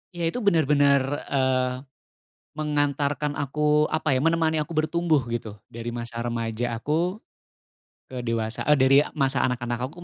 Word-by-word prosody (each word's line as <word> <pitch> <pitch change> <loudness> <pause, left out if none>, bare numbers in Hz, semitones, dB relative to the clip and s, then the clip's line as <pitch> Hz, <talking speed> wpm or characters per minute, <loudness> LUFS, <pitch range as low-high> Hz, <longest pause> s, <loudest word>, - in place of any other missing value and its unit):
Iya, 170 - -4
itu 245 - -4
benar-benar, 145 - +3 0.3
eee, 130 -2 +1 0.9
mengantarkan 145 -1 -1
aku 150 +1 +2
apa, 155 0 0
ya, - - 0
menemani 165 -1 +2
aku 150 +2 -4
bertumbuh, 155 -1 +1
gitu, 115 -3 -4 0.2
dari 115 +1 -6
masa 120 -1 -6
remaja 115 0 -2
aku 165 - -1 0.9
ke 130 - -5
dewasa, 115 -1 -2
eee, 150 0 +5
dari 135 +1 +5 0.2
masa 135 -3 +1
anak-anak 120 0 -2
aku 175 +5 -12
140 Hz, 140 wpm, -25 LUFS, 120-155 Hz, 0.9 s, eee